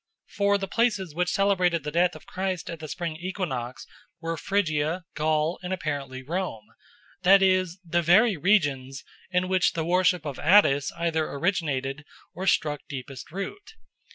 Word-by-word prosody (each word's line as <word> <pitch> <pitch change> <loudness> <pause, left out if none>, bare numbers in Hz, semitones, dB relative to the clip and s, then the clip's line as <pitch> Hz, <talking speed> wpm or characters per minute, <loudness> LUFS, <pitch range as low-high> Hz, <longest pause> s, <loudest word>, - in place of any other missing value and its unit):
For 200 0 +3
the 195 -1 -4
places 205 -6 0
which 180 +2 0
celebrated 180 -5 +2
the 150 - -4
death 175 +2 +2
of - - -12
Christ 185 -2 -3
at 165 - -7
the 155 - -7
spring 165 0 -4
equinox 165 -9 -4 0.3
were 165 0 -3
Phrygia, 165 -2 0
Gaul, 155 +2 0
and 180 0 -5
apparently 140 -7 -4
Rome, 155 - -3 0.6
that 195 +1 +6
is, 185 -2 +2
the 170 +1 +1
very 195 +6 +5
regions 145 -7 +1 0.3
in 180 0 +1
which 185 -1 +2
the 160 -1 -2
worship 180 -1 +2
of 145 -3 -5
Attis 145 -5 +4
either 165 -2 0
originated 140 -4 -1 0.3
or 185 +3 -5
struck 150 -5 +1
deepest 130 -2 -7
root. 395 - -7
170 Hz, 155 wpm, -26 LUFS, 150-185 Hz, 0.6 s, that